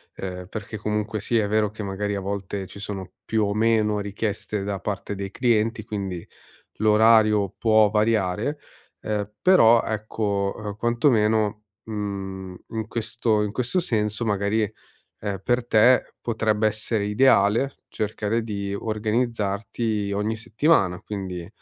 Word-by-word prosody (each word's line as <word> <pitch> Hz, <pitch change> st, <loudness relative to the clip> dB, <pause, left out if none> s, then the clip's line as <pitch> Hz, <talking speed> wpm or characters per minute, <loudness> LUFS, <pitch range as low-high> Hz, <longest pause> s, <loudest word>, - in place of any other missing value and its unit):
ehm, 90 Hz, -1 st, -6 dB
perché 110 Hz, 0 st, -6 dB
comunque 105 Hz, +1 st, -2 dB
sia 115 Hz, 0 st, +1 dB
è -, -, -2 dB
vero 105 Hz, 0 st, +2 dB
che 110 Hz, +1 st, -9 dB
magari 100 Hz, +1 st, -2 dB
a -, -, -2 dB
volte 100 Hz, 0 st, -4 dB
ci 100 Hz, -, -11 dB
sono 100 Hz, -2 st, -6 dB
più 110 Hz, -1 st, +1 dB
o 100 Hz, -, -1 dB
meno 110 Hz, -1 st, +2 dB
richieste 105 Hz, 0 st, -3 dB
da 100 Hz, -1 st, -3 dB
parte 100 Hz, 0 st, -4 dB
dei 100 Hz, 0 st, -5 dB
clienti, 115 Hz, -2 st, +1 dB
quindi 95 Hz, -5 st, -4 dB, 0.5 s
l'orario 110 Hz, -2 st, +4 dB
può 110 Hz, -2 st, +4 dB
variare, 110 Hz, +5 st, +1 dB, 0.4 s
ehm, 105 Hz, -1 st, -2 dB
però 120 Hz, -12 st, +6 dB
ecco, 105 Hz, -2 st, -1 dB
uhm, 105 Hz, -2 st, -5 dB
quantomeno, 110 Hz, -3 st, +2 dB, 0.2 s
mhmm, 95 Hz, -3 st, -5 dB
in 110 Hz, -1 st, -4 dB
questo 115 Hz, -1 st, 0 dB
in 105 Hz, -, -2 dB
questo 125 Hz, -, 0 dB
senso 110 Hz, -, -1 dB
magari, 105 Hz, +1 st, +1 dB, 0.6 s
ehm, 100 Hz, -2 st, -3 dB
per 120 Hz, -1 st, +1 dB
te 120 Hz, +3 st, +4 dB
potrebbe 110 Hz, -2 st, +1 dB
essere 110 Hz, 0 st, -2 dB
ideale 110 Hz, +2 st, +3 dB
cercare 110 Hz, +1 st, -2 dB
di 100 Hz, -2 st, -4 dB
organizzarti 110 Hz, -1 st, -1 dB
ogni 105 Hz, +2 st, -1 dB
settimana, 110 Hz, -, +2 dB
quindi 95 Hz, -4 st, -6 dB
105 Hz, 135 wpm, -24 LUFS, 100-110 Hz, 0.6 s, però